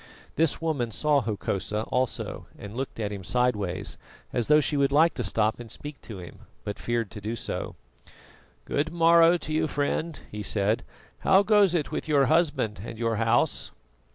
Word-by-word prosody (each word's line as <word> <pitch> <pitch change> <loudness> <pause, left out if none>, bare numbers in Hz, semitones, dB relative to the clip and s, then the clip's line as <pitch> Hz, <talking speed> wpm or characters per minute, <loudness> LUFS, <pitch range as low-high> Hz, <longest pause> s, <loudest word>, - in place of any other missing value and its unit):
This 160 -2 +2
woman 150 -8 -1
saw 145 +5 +2
Hokosa 105 -1 -2
also 130 -1 -2
and 100 +2 -9
looked 130 -2 -4
at 105 -2 -2
him 100 -2 -6
sideways, 105 -4 -1 0.3
as 120 -2 0
though 150 0 +6
she 150 +1 0
would 140 -1 +2
like 160 +4 +5
to 125 - -3
stop 110 +2 +1
and 120 -1 -9
speak 145 +3 -8
to 110 - -8
him, 90 -2 -10 0.2
but 100 - -5
feared 115 -3 -1
to 105 - -8
do 110 +3 -3
so. - - -4 0.9
"Good 150 +3 -1
morrow 170 0 +6
to 155 -2 -5
you, 155 0 +1
friend," 150 +2 -2
he 105 - -5
said. 105 +2 +1 0.4
"How 195 +1 +5
goes 205 -4 +4
it 155 -4 -1
with - - -3
your 145 -3 +4
husband 145 - +1
and 115 - -7
your 115 -1 0
house?" 115 +2 +1
125 Hz, 180 wpm, -27 LUFS, 110-155 Hz, 0.9 s, though